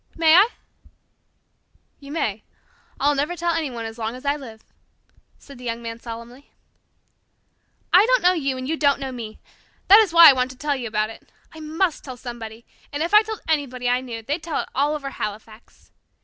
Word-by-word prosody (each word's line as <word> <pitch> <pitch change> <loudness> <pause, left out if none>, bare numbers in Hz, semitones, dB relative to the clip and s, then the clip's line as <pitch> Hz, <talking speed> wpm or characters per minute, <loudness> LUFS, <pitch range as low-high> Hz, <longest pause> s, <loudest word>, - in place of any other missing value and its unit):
May 320 -1 +4
I?" 385 +6 +7 1.5
"You 280 0 -11
may. 220 -10 -2 0.6
I'll 290 +1 +3
never 290 +5 -1
tell 345 0 -1
anyone 265 -9 -3
as 225 +1 -8
long 225 +1 -3
as 255 +2 -12
I 285 +1 +2
live," 230 -7 -11 0.7
said 275 -3 -15
the - - -12
Young 235 -1 -4
Man 230 0 -6
solemnly. 235 +4 -10 1.4
"I 390 +5 +7
don't - - +3
know 360 +1 +5
you 275 -6 -2
and 255 0 -5
you 320 +2 -1
don't 285 -2 +2
know 270 -1 -4
me. 225 -4 -8 0.5
That 410 +3 +10
is 425 -5 +3
why 335 0 +10
I 280 - +9
want 255 0 0
to 260 - -12
tell 290 +1 -1
you 250 -3 -5
about 215 0 -1
it. - - -16 0.2
I 320 - -11
must 320 +2 -1
tell 255 -3 -8
somebody, 235 -2 -9 0.3
and 290 +2 -2
if 340 - -3
I 425 - +9
told 440 0 -6
anybody 270 -6 -1
I 250 +1 +1
knew, 230 -3 -7
they'd 290 +8 -3
tell 315 -1 -2
it - - -10
all 290 +3 +1
over 275 -2 -5
Halifax. 215 +1 -8
275 Hz, 200 wpm, -22 LUFS, 235-315 Hz, 1.5 s, That